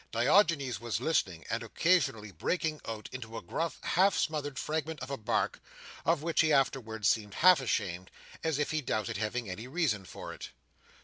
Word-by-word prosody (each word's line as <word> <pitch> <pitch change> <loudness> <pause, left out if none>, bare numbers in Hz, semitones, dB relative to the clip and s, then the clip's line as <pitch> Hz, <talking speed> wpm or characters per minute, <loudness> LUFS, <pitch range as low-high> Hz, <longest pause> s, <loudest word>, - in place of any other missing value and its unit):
Diogenes 140 - +3
was 120 -2 -2
listening, 95 - 0
and - - 0
occasionally 125 - +1
breaking 155 - -1
out 110 -1 -5
into 115 -3 -7
a - - -5
gruff 165 0 -2
half 185 0 +3
smothered 145 -3 -1
fragment 160 +1 -2
of 130 +2 -6
a - - 0
bark, 110 - 0 0.5
of 165 -2 +2
which 165 0 +3
he 155 -1 +3
afterwards 115 -7 +1
seemed 105 -2 +1
half 180 -4 +6
ashamed, 95 -7 -2 0.3
as 160 -3 +1
if 145 - 0
he 155 0 0
doubted 110 -7 -2
having 110 +3 -2
any 105 +6 -6
reason 130 - 0
for - - -8
it. - - -8
135 Hz, 175 wpm, -31 LUFS, 110-160 Hz, 0.5 s, half